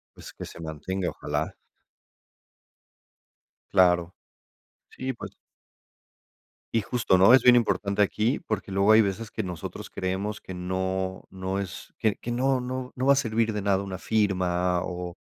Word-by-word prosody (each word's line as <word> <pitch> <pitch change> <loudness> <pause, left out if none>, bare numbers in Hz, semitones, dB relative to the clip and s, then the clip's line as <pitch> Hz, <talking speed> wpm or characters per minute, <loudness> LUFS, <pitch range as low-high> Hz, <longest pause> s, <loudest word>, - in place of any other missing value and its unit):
Pues, - - -11
que - - -7
se - - -11
mantenga, 85 +4 -3
ojalá. - - -3 2.2
Claro. 90 -2 +4 0.8
Sí, 130 +1 -4
pues - - -9 1.4
Y 115 - +3
justo, 110 -4 +2
¿no?, 95 +6 +7
es 130 - +7
bien 125 0 +8
importante 105 -3 +1
aquí, 110 +5 +1
porque 100 -2 -4
luego 100 +2 +4
hay 110 - +8
veces 105 +1 -2
que 110 - -2
nosotros 90 -4 -6
creemos 95 +3 -3
que 95 - -8
no 95 +1 -2
no 95 +1 -3
es 95 -3 -7
que 110 -2 +1
que 120 - -7
no 130 +2 +2
no 125 0 -4
no 130 +1 -2
va 140 - +7
a - - +2
servir 115 -4 +1
de 105 - -2
nada 100 -1 +2
una 95 -2 -5
firma 90 -4 +1
o 90 -1 -5
100 Hz, 155 wpm, -26 LUFS, 95-115 Hz, 2.2 s, bien